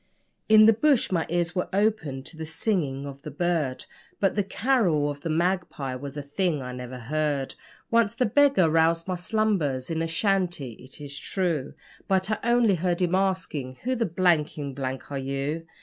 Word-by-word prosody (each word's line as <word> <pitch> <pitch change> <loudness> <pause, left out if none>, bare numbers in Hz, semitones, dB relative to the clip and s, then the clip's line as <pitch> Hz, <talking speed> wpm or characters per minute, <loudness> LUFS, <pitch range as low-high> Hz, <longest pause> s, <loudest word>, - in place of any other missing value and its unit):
In 215 0 +8
the 225 - +7
bush 270 +1 +2
my 170 -3 0
ears 175 0 0
were 180 -1 -2
opened 190 -10 0
to - - -9
the 160 - -6
singing 160 -5 -1
of 140 -1 -8
the 150 - -7
bird, 150 -4 -1 0.3
But 195 - +2
the 205 - +1
'carol 190 - +1
of 145 0 -9
the 165 - -4
magpie' 170 -5 -1
was 140 +2 -7
a 145 - -4
thing 155 +2 -1
I 125 -1 -6
never 125 0 -7
heard. 145 +2 -1 0.4
Once 230 -1 +3
the 250 - +2
beggar 275 - +4
roused 165 +1 +2
my 185 - -1
slumbers 175 - 0
in 160 0 -1
a 165 - 0
shanty, 175 - 0
it 130 - -12
is 145 -1 -8
true, 170 -8 -2 0.3
But 190 +1 +1
I 215 - 0
only 235 -3 +4
heard 180 0 0
him 175 0 0
asking, 185 -9 -1
'Who 255 +2 0
the 230 -3 0
blanky 160 -5 +1
blank 130 +1 -5
are 140 - -2
you?' 140 +4 -3
165 Hz, 185 wpm, -26 LUFS, 140-195 Hz, 0.4 s, In